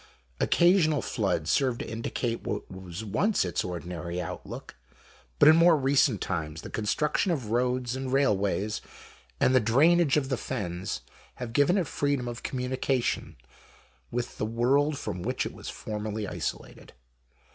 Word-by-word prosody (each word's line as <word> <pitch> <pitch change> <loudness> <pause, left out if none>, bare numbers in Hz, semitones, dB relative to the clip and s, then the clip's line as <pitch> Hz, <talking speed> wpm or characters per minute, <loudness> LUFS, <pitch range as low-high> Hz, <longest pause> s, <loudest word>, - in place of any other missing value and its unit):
Occasional 170 -4 +4
floods - - 0
serve 130 -4 +2
to - - -5
indicate 115 +1 -3
what 105 - -4
was 95 +2 -7
once 200 - +1
its 90 - -1
ordinary 90 -1 -5
outlook, 90 - -7 0.6
but - - +6
in 155 - +9
more 165 0 +6
recent 135 -5 +3
times 80 -3 -3
the - - -8
construction 150 - 0
of 130 -10 -2
roads 125 +1 0
and 130 -1 -4
railways, 105 -5 +1 0.6
and 130 - +4
the 130 - +6
drainage 145 +7 +4
of 135 -3 0
the 130 - 0
Fens, 90 - -4 0.3
have 120 -2 -6
given 145 +9 +4
it 185 - +1
freedom 140 -3 -1
of 120 0 -5
communication 130 0 -1 0.7
with 120 0 -4
the - - 0
world 135 +6 +2
from 90 - -4
which - - -1
it - - -5
was - - -8
formerly 105 0 -4
isolated. - - -6
120 Hz, 145 wpm, -28 LUFS, 105-140 Hz, 0.7 s, in